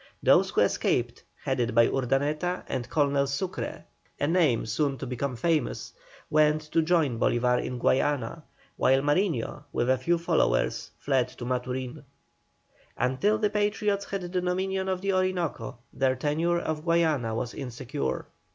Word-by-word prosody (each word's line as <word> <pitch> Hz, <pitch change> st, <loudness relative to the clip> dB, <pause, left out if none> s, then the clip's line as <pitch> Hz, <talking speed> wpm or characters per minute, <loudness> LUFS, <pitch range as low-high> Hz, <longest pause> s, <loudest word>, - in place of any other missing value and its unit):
Those -, -, +5 dB
who -, -, +1 dB
escaped, -, -, 0 dB, 0.2 s
headed 120 Hz, 0 st, -1 dB
by 115 Hz, -, +7 dB
Urdaneta 145 Hz, +7 st, 0 dB
and 130 Hz, -2 st, -3 dB
Colonel 140 Hz, -2 st, +2 dB
SUCRE, 160 Hz, +7 st, -4 dB, 0.3 s
a -, -, +1 dB
name 160 Hz, -8 st, +2 dB
soon 135 Hz, +5 st, 0 dB
to 135 Hz, -, -5 dB
become 130 Hz, +1 st, -3 dB
famous, 155 Hz, -1 st, -1 dB, 0.3 s
went 155 Hz, 0 st, +3 dB
to 165 Hz, -, +3 dB
join 155 Hz, -8 st, +1 dB
Bolívar 125 Hz, +1 st, +2 dB
in 125 Hz, -, -4 dB
Guayana, 145 Hz, +5 st, +1 dB, 0.4 s
while 135 Hz, +1 st, +4 dB
Mariño, 145 Hz, -, 0 dB
with 120 Hz, +2 st, +1 dB
a 130 Hz, -, +2 dB
few 170 Hz, +6 st, +1 dB
followers, 165 Hz, -, +1 dB
fled 130 Hz, -3 st, +1 dB
to 125 Hz, -1 st, -9 dB
Maturin. 125 Hz, +2 st, -3 dB, 0.9 s
Until 195 Hz, +13 st, +1 dB
the 210 Hz, -1 st, 0 dB
Patriots 205 Hz, -1 st, 0 dB
had 195 Hz, -1 st, -4 dB
the 175 Hz, -, -6 dB
dominion 190 Hz, +1 st, -1 dB
of 185 Hz, -1 st, -1 dB
the 195 Hz, 0 st, 0 dB
Orinoco 180 Hz, -11 st, -1 dB, 0.2 s
their 130 Hz, -1 st, +1 dB
tenure 155 Hz, +6 st, 0 dB
of 155 Hz, -2 st, -3 dB
Guayana 160 Hz, -9 st, +1 dB
was 120 Hz, +1 st, -3 dB
insecure. 125 Hz, -, -4 dB
145 Hz, 145 wpm, -27 LUFS, 125-175 Hz, 0.9 s, by